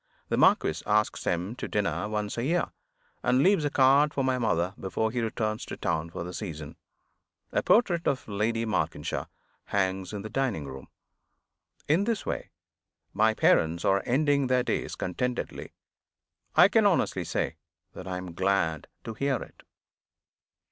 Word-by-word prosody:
The - - +1
marquis - - +3
asks 105 +1 +1
him 90 +6 -1
to - - -4
dinner 105 0 -1
once 105 -1 -2
a 115 - -2
year, 170 +6 0 0.5
and 130 +2 +3
leaves 190 -4 +4
a 145 - +1
card 140 +2 +4
for 135 - +1
my 130 -1 +1
mother 90 -5 0
before 110 +3 -1
he 120 0 -1
returns 110 -1 -2
to - - -6
town 80 -1 -1
for 85 - -5
the 90 +1 -7
season. 80 -8 -6 0.8
A - - +1
portrait 175 -7 +3
of 135 - -1
Lady 110 +2 0
Malkinshaw 110 -3 -2 0.4
hangs 95 -1 -1
in 105 -2 -5
the - - -5
dining 125 - -1
room. 65 -1 -9 1.0
In 165 +7 +3
this 230 -3 -1
way, - - -3 0.6
my 110 0 +3
parents 80 -3 +3
are 95 0 +3
ending 140 +1 +2
their 125 0 +2
days - - -2
contentedly. 125 +7 -3 0.8
I - - +8
can - - +4
honestly - - +1
say 80 - -2 0.4
that 90 - -9
I 90 -1 -3
am 90 -2 -7
glad 95 -3 0 0.2
to 115 - -5
hear 140 +4 0
it. - - -8
110 Hz, 160 wpm, -28 LUFS, 95-130 Hz, 1.0 s, I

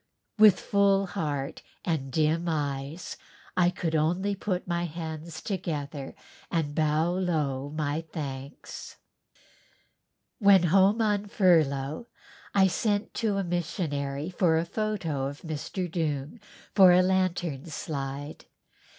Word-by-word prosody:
With 210 -3 +8
full 200 -1 +3
heart 145 -7 -3 0.2
and 150 -6 -1
dim 160 +4 +1
eyes 145 +1 -3 0.4
I 175 -1 +4
could 175 -2 -3
only 175 +6 +1
put 190 -2 -3
my 175 0 0
hands 160 -1 -6
together 150 -7 -4 0.3
and 155 -4 -1
bow 155 +2 +2
low 150 -7 -1
my 150 0 -2
thanks. 140 -3 -7 1.4
When 200 -4 +6
home 195 +6 +4
on 205 -1 +1
furlough 160 - +2 0.5
I 195 -1 +6
sent 205 +3 0
to 210 -3 +1
a 195 - 0
missionary 155 -4 -2
for 170 -2 +3
a 165 - 0
photo 170 -9 -2
of 145 +2 -7
Mr. 165 +3 -4
Doong 155 - -3 0.3
for 190 -3 +8
a 180 +1 +6
lantern 180 -6 0
slide. 145 -2 -5
165 Hz, 115 wpm, -28 LUFS, 145-185 Hz, 1.4 s, With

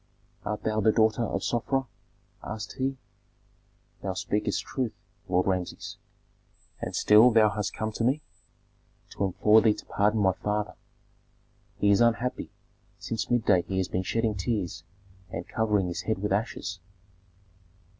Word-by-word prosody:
"Art 105 0 -3
thou 110 0 0
the 110 - +5
daughter 110 +1 +3
of 100 -4 -2
Sofra?" 135 +3 0 0.6
asked 110 0 -6
he. 135 +1 -1 1.0
"Thou 95 - -2
speakest 105 +3 -1
truth, 125 -4 -3 0.4
Lord 90 0 +2
Rameses." 90 -2 -3 0.8
"And - - -4
still 110 +4 +7
thou 110 -2 +5
hast 105 0 -3
come 110 0 -2
to 110 - -3
me!" 135 +5 +1 0.9
"To 100 - -1
implore 105 +4 +5
thee 110 -2 +4
to - - -11
pardon 105 +2 +1
my 95 -2 +4
father. 105 +2 -2 1.0
He 100 - +3
is 100 - +4
unhappy; 120 +1 +1 0.5
since 115 -1 -4
midday 105 -7 +3
he 95 +2 -4
has 95 - 0
been 90 - -1
shedding 115 +3 0
tears 95 -5 -2 0.5
and 85 -1 -6
covering 105 -3 +1
his 90 -1 -3
head 110 - -1
with 105 +1 -3
ashes." 100 -2 -2
105 Hz, 145 wpm, -27 LUFS, 95-115 Hz, 1.0 s, still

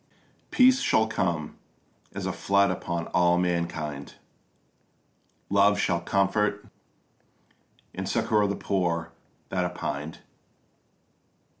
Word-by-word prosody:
Peace 260 +1 +5
shall 110 - +3
come 85 -8 -2 0.6
as - - -4
a - - -2
flood 100 -1 +2
upon 85 -2 -3
all 90 -1 +3
mankind; 85 -5 -2 1.3
Love 100 +1 +4
shall 85 -4 0
comfort 100 +3 0 1.3
and - - -4
succour 105 -2 +2
the 100 - -1
poor 85 -5 -1 0.4
that 90 -1 0
are 90 - -1
pined. 75 -3 -5
90 Hz, 100 wpm, -26 LUFS, 85-100 Hz, 1.3 s, Peace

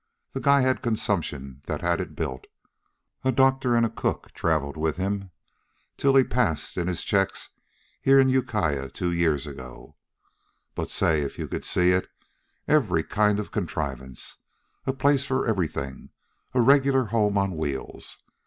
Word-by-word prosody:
The 135 - -3
guy 140 +1 +5
had 130 0 +1
consumption 80 - -2
that - - -3
had - - +1
it - - -7
built. 65 0 -4 0.8
A 130 - +3
doctor 130 -1 +3
an' 115 - +4
a - - 0
cook - - -3
traveled 75 -3 0
with 80 +2 -1
'm 100 0 -2 0.7
till 135 -1 +2
he 135 - +7
passed 120 -12 0
in 90 -1 -1
his 90 -2 -1
checks 95 -1 0 0.5
here 135 0 +6
in 135 - +5
Ukiah 105 - 0
two 90 +6 -2
years 80 -4 +1
ago. 65 -4 -10 0.8
But - - -4
say 80 -2 +2
if 70 - -4
you - - -4
could - - -4
see 90 0 +3
it. 95 +1 +1 0.6
Every 105 - +3
kind 105 +3 +2
of 105 - -4
a - - -34
contrivance 70 - -4 0.5
a 135 - +1
place 140 0 +3
for 135 -1 0
everything 80 - -2 0.5
a 125 - +5
regular 135 0 +4
home 105 -3 +2
on 100 -2 0
wheels. 70 -4 -4
100 Hz, 160 wpm, -26 LUFS, 80-130 Hz, 0.8 s, he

